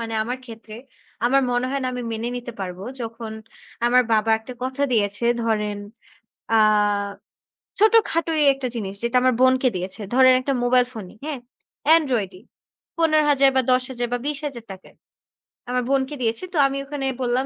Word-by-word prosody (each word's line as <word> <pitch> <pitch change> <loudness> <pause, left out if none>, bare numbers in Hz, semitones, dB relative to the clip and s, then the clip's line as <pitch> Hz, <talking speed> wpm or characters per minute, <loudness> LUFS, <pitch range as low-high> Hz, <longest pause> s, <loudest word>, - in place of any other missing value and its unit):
মানে 225 -1 -4
আমার 245 +3 -4
ক্ষেত্রে 225 -2 -11 0.5
আমার 270 +3 +4
মনে 245 +1 0
হয় 275 0 -1
না - - -1
আমি 250 0 -4
মেনে 225 +2 -3
নিতে 240 0 -7
পারব। 180 -1 -5 0.2
যখন 230 -1 -6 0.5
আমার 250 +1 +5
বাবা 220 0 +2
একটা 225 +3 -10
কথা 260 +2 -2
দিয়েছে 210 0 0 0.2
ধরেন 210 -2 -1 0.7
আ - - +4 1.2
ছোটখাটোই 335 -8 +3
১ 270 - -4
টা - - +1
জিনিস 200 -4 -4
যেটা 235 +1 +1
আমার 255 0 +3
বোনকে 260 0 +4
দিয়েছে। 185 +4 -5
ধরেন 260 0 +6
১ - - -8
টা - - +3
মোবাইল 250 0 +4
ফোনই, 210 -5 -9
হ্যাঁ? 300 -4 -4 0.6
এন্ড্রয়েডই। 225 - -1 0.6
৳১৫,000 300 -4 +4
বা 260 - +4
৳১০,000 255 -1 0
বা - - +1
৳২০,000 255 -10 -6 0.7
আমার 250 0 0
বোনকে 275 +1 0
দিয়েছে। 230 +5 -1
তো - - -2
আমি 275 0 -4
ওখানে 280 -1 -5 0.2
বললাম 250 +1 0
250 Hz, 160 wpm, -22 LUFS, 225-270 Hz, 1.2 s, ধরেন